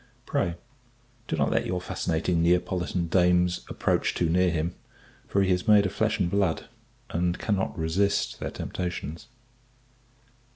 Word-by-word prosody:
Pray, 85 - 0 0.7
do - - -1
not 70 -3 +1
let - - +1
your 90 0 -1
fascinating 85 -1 -1
Neapolitan 90 +1 +1
dames 90 0 +2
approach - - 0
too 85 - +1
near 90 +2 +3
him; 85 +1 -1 0.5
for 100 - +2
he 95 - +1
is 90 +4 0
made 105 -1 +6
of 95 - -2
flesh 110 0 +1
and 90 - +2
blood, 100 -5 +1 0.5
and 85 +1 0
cannot 100 -3 -1
resist 95 +5 0
their - - -3
temptations. 90 +1 -5
90 Hz, 140 wpm, -27 LUFS, 85-95 Hz, 0.7 s, made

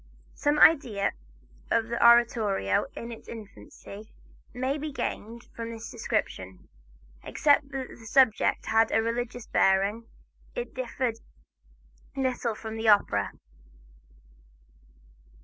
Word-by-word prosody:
Some 290 +1 0
idea 255 -12 +4 0.6
of 225 0 +1
the 235 - -1
oratorio 230 - +4
in 235 +1 -7
its 230 - -11
infancy 215 -1 -11 0.4
may 260 +4 -2
be 305 +1 -4
gained 235 -3 -5
from 230 0 -5
this 225 -1 -8
description. 150 - -4 0.6
Except 290 -1 +2
that 270 -2 -5
the 225 -1 -13
subject 250 -2 +3
had 225 0 +3
a 225 - +2
religious 240 +1 -3
bearing, 200 +4 +2 0.5
it - - -5
differed 255 - -3 1.0
little 255 -4 -1
from 220 0 -7
the 225 0 -2
opera. 100 - +3
230 Hz, 110 wpm, -27 LUFS, 215-255 Hz, 1.0 s, idea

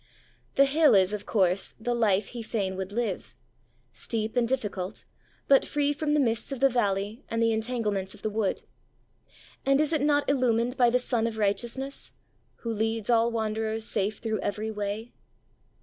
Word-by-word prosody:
The 275 - +6
hill 295 -1 +5
is, 190 +1 +4
of 210 -1 -5
course, 190 -2 +1
the 240 +2 -1
life 210 -4 +2
he 240 - -6
fain 200 -4 -2
would 190 +1 -5
live 220 -3 -3 0.6
steep 220 - -3
and 240 -1 +2
difficult, 210 -6 -3 0.4
but 275 -1 +6
free 290 0 0
from 295 0 0
the - - +3
mists 230 -1 0
of 270 - -4
the 275 +1 +5
valley 205 0 -1
and 230 - -1
the 230 0 +3
entanglements 220 -4 -2
of - - -17
the 215 - 0
wood. 210 -2 -1 1.0
And 275 +1 +3
is 305 +1 +1
it 310 - +1
not 290 0 +2
illumined 250 -3 +2
by 245 -2 +4
the 245 - +3
Sun 240 -2 0
of 225 -1 -5
Righteousness 240 +6 -2 0.5
'Who 230 -1 -2
leads 225 +1 -1
all 230 0 +3
wanderers 220 0 -1
safe 205 -1 -1
through 220 -2 -2
every 215 +2 -2
way'? 210 +2 -4
225 Hz, 175 wpm, -27 LUFS, 210-250 Hz, 1.0 s, The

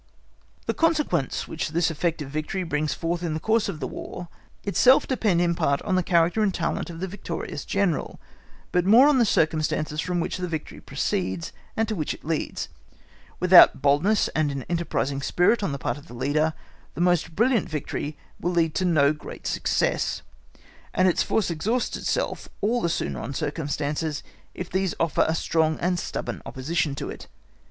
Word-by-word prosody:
The - - 0
consequence 300 - +1
which 160 - -3
this 165 +1 +1
effect 165 0 -1
of 135 - -9
victory 155 +5 -2
brings 150 -2 -1
forth 170 +1 -2
in 165 -3 -2
the - - -2
course 220 +4 +1
of 165 -6 -5
the - - -3
War 175 -1 -7 0.3
itself 250 +6 +5
depend 210 -9 +1
in 170 -1 +2
part 140 -4 +1
on 190 - -1
the 185 - +3
character 170 +4 +2
and 210 -2 +3
talent 175 0 -2
of 165 -1 -8
the 190 - -1
victorious 175 -6 -5
General, 195 -6 -1 0.5
but 180 - +2
more 230 +9 +7
on 290 -3 +4
the 235 - +5
circumstances 155 -2 +1
from 180 -1 -1
which 170 - -2
the 180 0 -3
victory 160 -3 -5
proceeds, 170 +4 -2 0.2
and 225 0 +2
to 220 - -2
which 155 -7 -2
it - - -18
leads. 160 -1 -2 0.7
Without - - +7
boldness 155 +10 +3
and 155 -2 0
an 135 -2 -4
enterprising 165 -5 -1
spirit 180 +11 +2
on 195 - -1
the 140 - -3
part 140 - -3
of 145 - -17
the 120 - -11
leader, 150 +5 +1 0.4
the - - -7
most 175 -2 +2
brilliant 230 -1 +2
victory 150 0 -4 0.2
will 175 +1 -1
lead 165 -2 +2
to 185 - 0
no 155 -4 +4
great 150 - -10
success, - - 0 0.7
and 185 - +4
its 180 - +2
force 210 -5 +1
exhausts 220 +10 -1
itself - - -2
all 235 +4 +1
the 170 - +1
sooner - - -2
on 140 - -5
circumstances, 150 0 -2 0.3
if 180 - -5
these 190 0 -1
offer 165 -1 +2
a 160 - +1
strong 160 -1 +1
and 180 0 0
stubborn - - -4
opposition 145 +2 -2
to - - -4
it. - - -10
170 Hz, 185 wpm, -25 LUFS, 155-190 Hz, 0.7 s, more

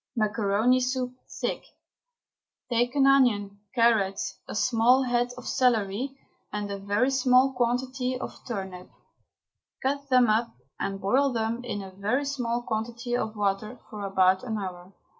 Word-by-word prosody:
MACARONI 215 +2 +2
SOUP 255 0 -1 0.2
(THICK). - - -3 1.1
Take 245 +2 +1
an 275 -1 +4
onion, 215 -7 +3 0.2
carrot, 220 -5 +3 0.3
a - - -6
small 240 +4 +4
head 245 -1 +1
of 250 - -9
celery 250 +1 +1 0.3
and 205 -1 -3
a 200 - -4
very 205 +7 +1
small 260 0 +4
quantity 250 +1 -1
of - - -5
turnip; 190 -6 -5 0.9
cut 280 +1 -1
them 255 -2 +5
up 225 +2 +1 0.2
and 195 0 -3
boil 260 +9 +2
them 230 +1 -2
in 205 -5 -4
a 190 - -9
very 210 +9 -1
small 245 -4 -2
quantity 235 +2 -3
of 220 -2 -2
water 210 +3 -1
for 210 -2 -6
about 190 -1 +3
an 225 -3 -3
hour. 185 -2 -6
235 Hz, 140 wpm, -27 LUFS, 205-255 Hz, 1.1 s, them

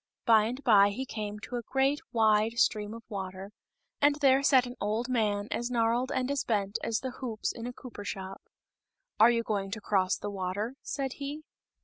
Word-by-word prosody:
By 220 -3 +6
and 250 +5 -4
by 205 -5 +6
he 255 +7 -4
came 210 -3 -5
to 245 - -5
a - - -3
great 270 +4 +1
wide 220 -1 +3
stream 210 -1 +1
of 230 - -10
water, 195 -1 -6 0.5
and 290 0 +5
there 275 -2 +4
sat 265 -3 +5
an 245 0 -7
old 215 +4 -1
man 210 -4 0
as 240 +1 -2
gnarled 240 +1 +1
and 260 +1 -1
as 280 - 0
bent 205 -2 -1
as 225 -1 -1
the 260 - -4
hoops 235 -4 -3
in 230 0 -7
a - - -4
cooper 245 -4 -10
shop. 195 -1 -6 0.8
"Are - - +8
you 230 -1 +1
going 200 -3 -2
to 220 +3 -4
cross 190 -3 +1
the 205 - -5
water?" 200 +4 -3
said 270 -2 -3
he. 290 +2 -5
230 Hz, 200 wpm, -29 LUFS, 205-255 Hz, 0.8 s, Are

